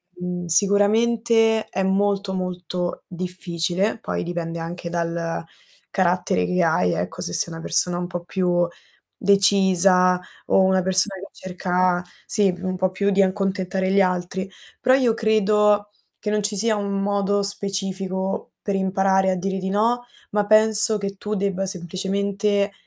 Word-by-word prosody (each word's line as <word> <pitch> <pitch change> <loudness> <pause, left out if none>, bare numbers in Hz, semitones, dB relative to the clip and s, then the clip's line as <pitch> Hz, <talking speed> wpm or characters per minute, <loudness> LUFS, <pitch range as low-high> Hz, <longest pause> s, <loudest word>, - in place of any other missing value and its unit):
uhm, 180 0 -4
sicuramente 220 +4 +3
è 190 - -1
molto, 195 0 +1
molto 180 -1 -4
difficile 180 +2 -2
poi - - -3
dipende 170 -1 -4
anche 170 +1 -6
dal 170 -1 -2 0.5
carattere 180 - +1
che 180 0 +1
hai 125 - +2
ecco, 85 +2 -4
se 85 - -4
sei 170 - -1
una 165 - -7
persona 175 +2 +1
un 175 0 -3
po' 175 -1 -5
più 175 -1 +1 0.5
decisa 190 -2 +4 0.3
o - - +4
una 190 0 +3
persona 190 +1 +1
che 195 - -9
cerca, 180 -1 0 0.2
sì, 200 -4 +2
un 185 0 -3
po' 185 0 +1
più 200 +2 0
di 195 0 +3
accontentare 190 -1 -1
gli 200 +1 +4
altri; 180 +1 -2 0.3
però 255 +1 +4
io 250 -4 +3
credo 210 -2 +2 0.3
che - - -6
non 210 0 +1
ci 205 +1 -2
sia 220 +2 +2
un 200 -1 -2
modo 200 0 +1
specifico 195 -1 -3
per 200 - -2
imparare 190 0 +2
a 185 - 0
dire 190 +1 -2
di 190 0 -3
no, 230 +5 +1 0.3
ma 210 0 +1
penso 215 0 +4
che 200 -1 -4
tu 210 +2 -4
debba 195 -1 -1
semplicemente 200 +3 -1
190 Hz, 150 wpm, -22 LUFS, 180-205 Hz, 0.5 s, decisa